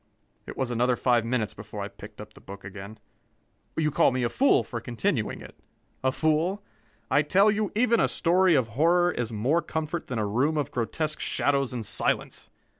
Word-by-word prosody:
It - - -8
was 130 -2 -1
another 120 +1 +2
five 120 -2 +2
minutes 115 -3 -1
before 105 0 -8
I - - -4
picked 105 0 -13
up 105 0 -10
the - - -16
book 100 0 -11
again. 100 +2 -9 0.8
You 155 -1 +1
call - - +4
me 130 0 -1
a 120 - +1
fool 275 - +3
for 115 -3 -6
continuing 120 - -2
it? - - -12 0.5
A 130 - +2
fool? 160 +8 0 0.5
I 145 - +5
tell 195 +8 +4
you, 210 0 -1
even 235 0 +3
a - - +3
story 180 0 +3
of 125 -5 +1
horror 170 +8 +3
is 120 -7 -3
more 125 +10 +1
comfort 160 +1 -4
than 125 - -4
a 110 - 0
room 130 +10 +1
of 145 -4 -2
grotesque 155 +6 -2
shadows 140 -2 0
and 120 -3 -4
silence. - - -1
130 Hz, 190 wpm, -26 LUFS, 115-165 Hz, 0.8 s, I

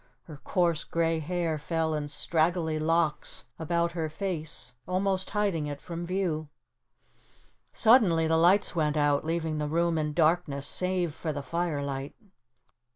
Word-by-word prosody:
Her 155 -3 -11
coarse, 170 +2 0
gray 165 -1 0
hair 165 -1 -1
fell 160 +1 -1
in 150 -1 -2
straggly 160 +1 0
locks 160 0 0 0.2
about 170 +1 0
her 165 -2 -2
face 160 -4 -4
almost 190 +1 0
hiding 195 -7 0
it 145 -1 -5
from 170 +2 -6
view. 170 -5 -1 1.2
Suddenly 205 -9 +5
the 160 0 +2
lights 180 +4 +4
went 155 -2 +1
out, 145 -1 +2
leaving 160 -1 -1
the 150 - -1
room 165 +1 +1
in 150 -1 -1
darkness, 155 -3 +1
save 180 -1 -1
for 160 +1 -3
the 145 -1 -5
firelight. 140 -3 -3
165 Hz, 140 wpm, -28 LUFS, 150-175 Hz, 1.2 s, Suddenly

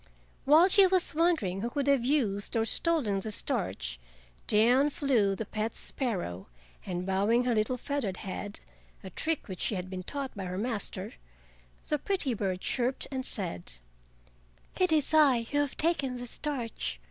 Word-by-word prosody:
While 310 +6 +7
she 390 0 +6
was 370 -1 +2
wondering 300 - +1
who 235 - -2
could 280 +2 -2
have 280 -3 +3
used 235 -7 0
or 225 - +2
stolen 255 - +1
the 215 +3 -4
starch, - - 0 0.5
down 245 +7 +4
flew 245 -9 +1
the 225 - -4
pet 215 +2 -3
sparrow, 180 - -3 0.4
and 180 -1 -3
bowing 200 +6 +2
her 245 -1 +1
little 220 +3 0
feathered 250 -8 -3
head—a 195 0 -9
trick 320 -1 -2
which 185 -3 -6
she 215 - 0
had 185 0 -5
been 185 -1 -4
taught 275 +7 -5
by 195 -2 -5
her 180 0 -4
master—the - - -5
pretty 360 -10 -1
bird 190 -4 -2
chirped 255 +1 -1
and 260 -1 -3
said: 170 - -4 1.1
"It 365 -2 +3
is 310 -1 +2
I 280 -7 +5
who 290 - +1
have 290 -2 -1
taken 285 -6 +1
the 245 0 -6
starch. 235 - -3
230 Hz, 160 wpm, -29 LUFS, 190-285 Hz, 1.1 s, While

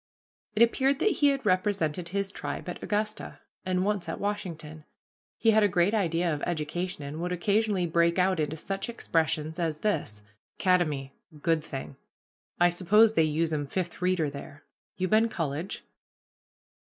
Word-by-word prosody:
It 220 - +6
appeared 265 +4 +2
that 425 - +2
he 290 - +4
had 275 -3 +1
represented 185 -4 0
his 200 +1 -2
tribe 145 -4 -5
at 180 - -6
Augusta, 215 +1 -2 0.2
and 185 0 0
once 200 -5 -1
at - - -4
Washington. 170 -7 -4 0.5
He 225 - +4
had 220 0 +4
a 205 - +5
great 180 +2 +2
idea 170 -5 +1
of 145 - -4
education, 175 0 -3
and 145 +3 -6
would 180 +1 -2
occasionally 200 +1 +1
break 170 +1 +2
out 185 -1 +2
into 155 0 -1
such 195 +7 -4
expressions 160 -6 -1
as 160 -3 -2
this, 105 - -1 0.3
"Kademy 155 -8 +1 0.3
good 165 0 +1
thing 135 -2 -7 0.6
I 175 0 +6
suppose 210 +5 +4
they 165 - +3
usum 155 -1 -1
Fifth 175 +3 -4
Reader 180 -5 +1
there. 140 +1 -10 0.3
You 185 0 -1
been 220 +3 +3
college?" 165 +1 -3
175 Hz, 155 wpm, -28 LUFS, 155-205 Hz, 0.6 s, It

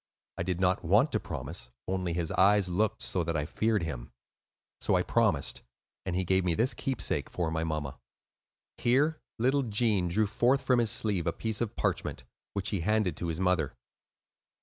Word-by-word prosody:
I - - 0
did 90 0 -1
not 95 0 +2
want - - +4
to - - +1
promise, 60 - -5 0.2
only 90 -2 -1
his 85 -1 -2
eyes 100 0 +4
looked 105 +4 0
so 90 - 0
that 85 0 -1
I 75 - -1
feared 110 +3 0
him; 65 -7 -5 0.7
so - - +1
I - - +3
promised; - - +1 0.5
and 90 - -1
he 95 - +1
gave 95 +1 +2
me 90 -2 +1
this 125 - +2
keepsake, 135 -3 -2
for 85 -3 -2
my 80 0 -1
mamma." 75 -4 -3 0.8
Here 145 +6 +2 0.2
little 130 +5 +2
Gene 110 -5 +2
drew 105 +6 +2
forth 120 +6 +2
from 125 -2 +3
his 115 -2 +1
sleeve 100 -8 0
a - - +3
piece 110 -1 -3
of 115 -3 -2
parchment, - - -1 0.3
which 100 -2 -1
he 100 - -1
handed 100 -1 +1
to 85 - -3
his 80 0 -3
mother. 90 -5 +1
95 Hz, 185 wpm, -30 LUFS, 85-110 Hz, 0.8 s, want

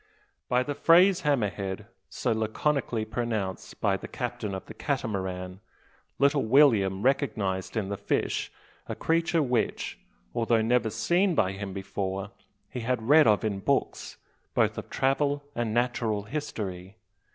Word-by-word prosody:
By 125 0 +3
the 145 - -3
phrase 180 +5 +5
"hammer 140 - +2
head," 95 -2 -5 0.2
so - - -1
laconically 110 +2 0
pronounced 110 -4 -3
by - - +2
the - - -8
captain 100 -2 -4
of 95 - -7
the - - -10
Catamaran, 95 -9 -3 0.6
little 140 0 +3
William 110 -7 +4
recognised 110 -8 0
in 100 -3 -1
the 100 - -3
fish 100 - -1 0.4
a - - -3
creature 165 0 +1
which, 125 -4 -1 0.3
although 115 -1 +2
never 115 -1 +2
seen 175 - +1
by 95 -8 +2
him 100 0 -6
before, 95 0 -4 0.4
he 125 - -6
had 115 0 -2
read 155 -1 +7
of 105 +1 +4
in 100 -2 -1
books, - - -1 0.4
both - - +2
of - - -9
travel 145 +2 +1
and 120 -3 -2
natural 120 -3 0
history. 100 -8 -5
115 Hz, 140 wpm, -27 LUFS, 100-140 Hz, 0.6 s, read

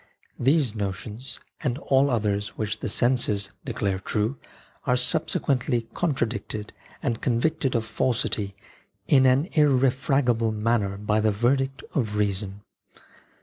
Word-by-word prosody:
These 135 -2 +3
notions, 105 +4 -5 0.2
and 130 -5 -1
all 140 -3 +2
others 105 -4 -1
which 110 0 -2
the - - -3
senses 105 -4 +1
declare 95 -2 -2
true, 105 +5 -1 0.5
are 125 - +4
subsequently 125 0 +1
con 165 -5 0
tradicted 110 -3 -3 0.3
and 120 -5 -1
convicted 135 +3 0
of 115 -1 +1
falsity 110 -3 -1 0.5
in 130 -3 +5
an 130 +2 +4
irre 135 -4 +4
fragable 125 -5 +1
manner 105 -3 0
by 105 +1 +1
the 110 - +3
verdict 135 +6 0
of 110 -7 -1
reason. 100 -1 -1
115 Hz, 125 wpm, -25 LUFS, 105-130 Hz, 0.5 s, in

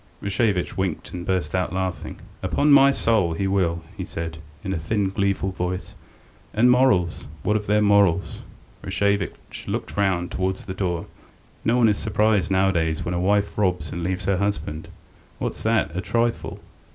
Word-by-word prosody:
Rashevitch 100 -2 0
winked 95 -5 -2
and 90 0 -6
burst 90 -6 0
out 90 -1 0
laughing. 95 -1 -3 0.2
"Upon 145 +1 +2
my 140 -1 +8
soul, 110 -10 +2
he 90 +4 -2
will!" 90 -4 0
he - - -4
said, 80 -1 -5 0.2
in 95 - -2
a 85 - -2
thin, 100 +4 0
gleeful 100 0 0
voice. 90 0 -4 0.6
"And 120 +3 +5
morals! 100 -10 +2 0.2
What 105 - +1
of 105 -1 -2
their 105 +1 +3
morals?" 100 -3 +3 0.4
Rashevitch 100 -1 -2
looked - - -3
round 95 -3 +1
towards 95 0 -2
the 95 - -5
door. 90 -3 -2 0.6
"No 115 +2 +2
one 120 -2 +5
is 105 -2 +2
surprised 105 -2 +2
nowadays 95 -5 +1
when 90 - -2
a 90 - -1
wife 100 +2 +1
robs 90 -6 0
and 85 - -4
leaves 90 +1 -2
her 100 -1 +2
husband. 100 -5 -2 0.5
What's - - -4
that, 80 - +1
a 90 - -1
trifle! 115 +3 -1
95 Hz, 165 wpm, -23 LUFS, 90-105 Hz, 0.6 s, my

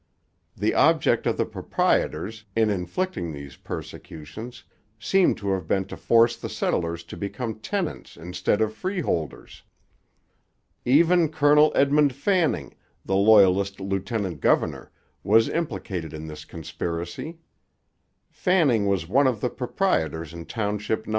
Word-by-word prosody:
The - - +1
object - - +3
of - - 0
the - - +1
proprietors, 110 +1 -1
in 110 -1 +3
inflicting 90 - -3
these 70 -2 -9
persecutions, 105 +9 -9 0.3
seems 185 - +2
to 100 -1 -1
have 95 -4 -2
been 95 +2 +1
to 95 - -8
force 115 0 +3
the - - -7
settlers 85 0 -2
to - - -10
become 110 +3 -5
tenants 185 - -4
instead 90 +5 -1
of 110 0 +1
freeholders. 145 - -3 1.2
Even 165 +5 +4
Colonel 150 0 +4
Edmund 140 -1 +3
Fanning, 175 +2 0 0.3
the 95 - 0
Loyalist 100 -1 +4
lieutenant 95 - -3
governor, - - +1 0.3
was 110 +3 +4
implicated 95 - -4
in 80 0 -7
this 75 -1 -9
conspiracy. 85 - -5 0.9
Fanning 145 - +2
was 95 -4 0
one 135 +8 +3
of 120 -5 0
the 125 - -1
proprietors 80 - -1
in 85 0 -9
Township 105 0 -2
No. - - -10
105 Hz, 125 wpm, -25 LUFS, 90-140 Hz, 1.2 s, Even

